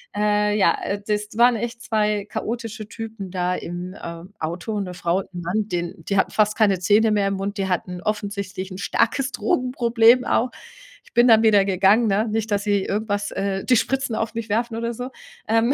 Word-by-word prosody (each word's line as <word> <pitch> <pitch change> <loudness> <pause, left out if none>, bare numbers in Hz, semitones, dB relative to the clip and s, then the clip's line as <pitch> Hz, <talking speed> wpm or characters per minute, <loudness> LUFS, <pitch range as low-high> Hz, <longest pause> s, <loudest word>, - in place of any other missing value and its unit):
Äh, 210 0 +2
ja, 180 -5 +4
äh, 200 - -2
das 210 0 -2
waren 240 +1 +5
echt 235 +1 -5
2 210 -2 0
chaotische 225 -1 -4
Typen 220 -3 -7
da 180 -1 0
im, 180 +2 -6
ähm, 170 +3 -8
Auto, 175 +7 -3
'ne 185 -2 -4
Frau 175 0 0
und - - -7
'n 175 - -4
Mann, 200 +5 -1
den 175 -1 -4
die 200 - 0
hatten - - +2
fast 215 0 +2
keine 200 -4 +3
Zähne 210 +4 +3
mehr 205 -2 +2
im 195 - -1
Mund, 195 +1 -4
die 195 -1 -1
hatten 180 0 -2
offensichtlich 200 -2 -4
'n 185 - -7
starkes 240 +6 0
Drogenproblem 240 +1 +3
auch. 250 - +1 0.5
Ich 480 - -23
bin 240 +1 +5
dann 225 -1 +6
wieder 210 -3 +5
gegangen, 195 +4 +4
ne? 210 +2 +1
Nicht, 220 0 -2
dass 200 0 +1
sie 205 -2 +2
irgendwas, 205 -1 -2
äh 195 0 -2
die 255 - +4
Spritzen 265 -1 0
auf 225 0 -2
mich 230 -1 -5
werfen 230 +2 0
oder 235 +1 -2
so. 250 +3 -6 0.4
Ähm, 225 +3 +3
210 Hz, 200 wpm, -22 LUFS, 195-225 Hz, 0.5 s, dann